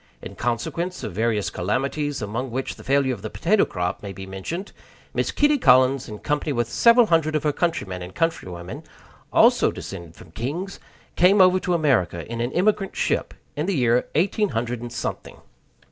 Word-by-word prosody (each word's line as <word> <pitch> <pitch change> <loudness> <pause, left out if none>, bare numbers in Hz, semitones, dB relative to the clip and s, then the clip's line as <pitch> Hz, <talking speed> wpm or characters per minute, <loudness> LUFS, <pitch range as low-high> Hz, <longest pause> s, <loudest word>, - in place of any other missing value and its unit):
In - - -9
consequence 170 +10 -3
of - - -5
various 110 0 0
calamities, 135 +7 -2
among 115 +6 -3
which 130 +3 -3
the - - -13
failure 135 -1 +2
of 110 - -8
the 110 - -5
potato 195 - +2
crop 90 +4 -3
may 100 -2 -6
be 95 0 -8
mentioned, 95 - -6 0.4
Miss - - 0
Kitty 295 0 +2
Collins, 130 - +4
in 105 - -7
company 150 +5 -2
with 120 -4 0
several 235 - +5
hundred 160 -4 +2
of 155 - 0
her 150 - +2
countrymen 105 - -2
and 90 +1 -9
countrywomen 90 - -3 0.5
also - - +5
descended 85 -4 -8
from 80 - -15
kings 150 - -4 0.4
came 190 +3 +5
over 185 0 +6
to 180 -1 0
America 110 - +1
in 115 0 -4
an 120 +2 -1
emigrant 195 +1 +1
ship, - - -1 0.2
in 150 +4 -2
the 195 - 0
year 125 -2 +2
eighteen 200 +6 +2
hundred 120 0 -3
and 120 0 -6
something. 120 - -5
130 Hz, 180 wpm, -23 LUFS, 105-170 Hz, 0.5 s, over